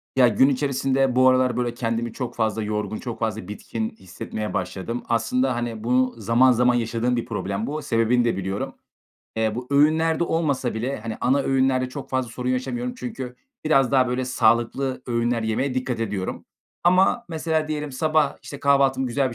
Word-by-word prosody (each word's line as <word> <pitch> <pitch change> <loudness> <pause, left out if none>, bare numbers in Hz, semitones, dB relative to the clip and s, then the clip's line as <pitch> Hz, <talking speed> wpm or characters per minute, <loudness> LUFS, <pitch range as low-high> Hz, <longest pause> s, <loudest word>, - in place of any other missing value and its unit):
Ya, 130 -2 +6
gün 125 +5 +4
içerisinde 135 -1 +1
bu 130 0 +5
aralar 130 -1 +2
böyle 120 -1 -1
kendimi 115 -1 -2
çok 125 -2 -5
fazla 110 -1 0
yorgun, 105 0 -2
çok 120 -3 -6
fazla 110 -5 -2
bitkin 110 +2 -4
hissetmeye 105 +2 -6
başladım. 115 +6 -3
Aslında, 125 +3 +1
hani, 120 -2 -4
bu 125 +2 +2
zaman 115 +4 +4
zaman 125 +1 +3
yaşadığım 120 +1 0
bir 120 -1 -2
problem 105 -2 -3
bu, 155 +2 -3
sebebini 120 -1 +2
de 115 - +1
biliyorum. 95 +1 -3 0.6
Eee, 110 -1 +1
bu 125 +2 -5
öğünlerde 160 +3 +3
olmasa 145 -8 0
bile, 120 +3 -3
hani, 110 0 -5
ana 130 +3 +3
öğünlerde 130 -1 +1
çok 135 +2 -8
fazla 130 -2 -1
sorun 125 +2 -4
yaşamıyorum 240 - -2
çünkü 215 - -6 0.3
biraz 135 -5 +3
daha, 130 -2 +3
böyle, 125 +1 -1
sağlıklı 125 +2 +1
öğünler 120 -1 0
yemeye 110 +5 -1
dikkat 130 -2 -2
ediyorum. 100 -4 -3 0.4
Ama 185 +7 +4
mesela 160 -1 -1
diyelim 150 -2 -3
sabah, 155 +1 +1
işte, 140 - -9
kahvaltımı 135 -2 +3
güzel 130 +2 0
bir - - -8
125 Hz, 175 wpm, -23 LUFS, 115-135 Hz, 0.6 s, Ya